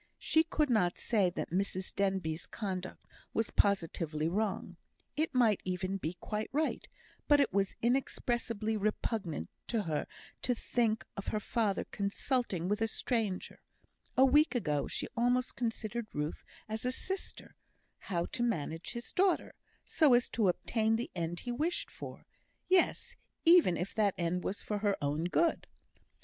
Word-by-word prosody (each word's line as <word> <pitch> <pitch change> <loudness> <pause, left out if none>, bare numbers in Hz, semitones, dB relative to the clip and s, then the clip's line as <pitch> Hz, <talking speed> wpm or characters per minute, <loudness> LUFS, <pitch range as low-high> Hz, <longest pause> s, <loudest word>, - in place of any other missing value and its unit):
She 320 - +3
could 305 -3 0
not 180 -6 +2
say 205 -6 +2
that 175 - -5
Mrs 190 0 -1
Denbigh's 190 -5 -1
conduct 185 -3 -5 0.3
was 225 - 0
positively 165 -5 +1
wrong 190 -1 -1 0.4
it 310 -1 -1
might 225 -5 +4
even 185 +1 -2
be 175 -2 -3
quite 210 +4 -4
right; 305 +3 -1 0.4
but 290 -1 +6
it 280 - +2
was 195 -1 +1
inexpressibly 235 -3 0
repugnant 210 - -2 0.2
to 225 -3 0
her 155 -4 -2 0.3
to 250 - +1
think 225 -1 0
of 200 - -6
her 215 - 0
father 215 -2 0
consulting 200 - -1
with 210 +3 0
a 225 - +3
stranger 220 -4 -1 0.6
(a 265 - +8
week 295 +2 +4
ago 150 -11 0
she - - -3
almost 245 +1 +1
considered 225 -1 -2
Ruth 150 +1 -3 0.2
as 220 +1 -4
a 250 - +1
sister) 380 +9 -4 0.5
how 175 -4 -2
to - - -4
manage 165 -8 -1
his 235 -2 -6
daughter, 375 -1 +2 0.3
so 295 -7 +5
as 240 - +3
to 220 -4 +1
obtain 220 +4 +1
the 235 +2 -3
end 170 0 -3
he 245 - -4
wished 340 - -1
for; - - -9 0.4
yes, 370 -1 +2 0.3
even 330 - +7
if 180 +4 -3
that 205 -3 +2
end 175 +1 -1
was 200 - -3
for 210 -1 -2
her 205 -1 +1
own 150 +2 -1
good. 330 - +1
215 Hz, 155 wpm, -33 LUFS, 180-245 Hz, 0.6 s, a